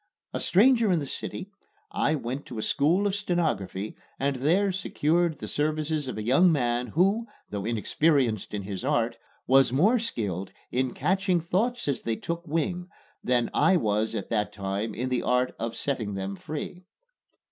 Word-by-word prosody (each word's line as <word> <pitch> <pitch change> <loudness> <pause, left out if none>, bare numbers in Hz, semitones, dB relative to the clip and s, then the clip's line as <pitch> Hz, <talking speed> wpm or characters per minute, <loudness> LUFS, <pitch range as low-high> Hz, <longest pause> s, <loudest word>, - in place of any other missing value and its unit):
A - - -2
stranger 230 +3 +4
in 175 - +3
the 150 - -2
city, 185 +7 -5 0.4
I 155 - +1
went 135 0 -4
to 120 - -7
a 110 - -2
school 170 +8 +2
of 200 - +1
stenography 155 - -1 0.2
and 140 0 0
there 180 +9 +2
secured 170 -2 +1
the - - -6
services 155 0 -1
of 130 - -4
a 110 - -3
young 140 +10 +5
man 120 -4 +1
who, 195 - +2 0.2
though 100 -1 -3
inexperienced 120 - +1
in 100 - -3
his 100 +2 -5
art, 120 -4 0 0.3
was 135 -1 +5
more 200 - +4
skilled 100 - -3 0.2
in 130 0 0
catching 185 +3 +1
thoughts 205 +9 -1
as 140 - 0
they 115 - -1
took 170 +7 -5
wing 175 +4 -1 0.3
than 125 -1 +1
I 190 - +4
was 110 -5 0
at - - -4
that 105 -2 0
time 100 +2 -3
in 125 +2 -2
the 125 -1 0
art 125 0 +1
of 115 0 -3
setting 115 -8 -2
them 95 0 -3
free. 155 - -6
140 Hz, 170 wpm, -27 LUFS, 115-175 Hz, 0.4 s, young